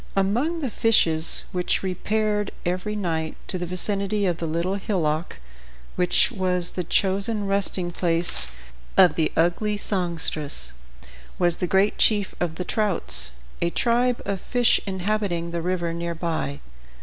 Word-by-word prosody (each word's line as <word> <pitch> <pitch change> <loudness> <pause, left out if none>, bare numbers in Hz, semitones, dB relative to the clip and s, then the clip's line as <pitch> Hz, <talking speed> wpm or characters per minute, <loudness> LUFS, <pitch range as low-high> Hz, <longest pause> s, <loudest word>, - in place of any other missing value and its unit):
Among 240 - 0
the 265 -5 -2
fishes 165 -9 +2
which 180 +1 -1
repaired 210 +2 -1 0.2
every 185 +4 -2
night 160 -5 -2
to 185 - -4
the 175 - -3
vicinity 200 +3 -1
of 175 -3 0
the 165 - -3
Little 170 +4 -1
Hillock, 170 - -2 0.6
which 180 -1 +3
was 180 -4 0
the 180 - -3
chosen 200 +4 +1
resting 195 -2 +1
place 170 - +2 0.5
of 185 -2 +7
the 160 -2 0
ugly 190 +6 +1
songstress, 160 - 0 0.6
was 175 -2 +2
the 180 - -1
great 195 +3 +2
chief 205 -3 +3
of 170 -2 -2
the 180 - -4
trouts, 210 - +1 0.3
a 170 - +2
tribe 240 +5 +1
of 195 -2 -3
fish 245 -2 +2
inhabiting 190 -3 -2
the 170 0 -3
river 175 -1 -1
near 170 0 -4
by. 160 -4 -3
185 Hz, 140 wpm, -24 LUFS, 170-205 Hz, 0.6 s, of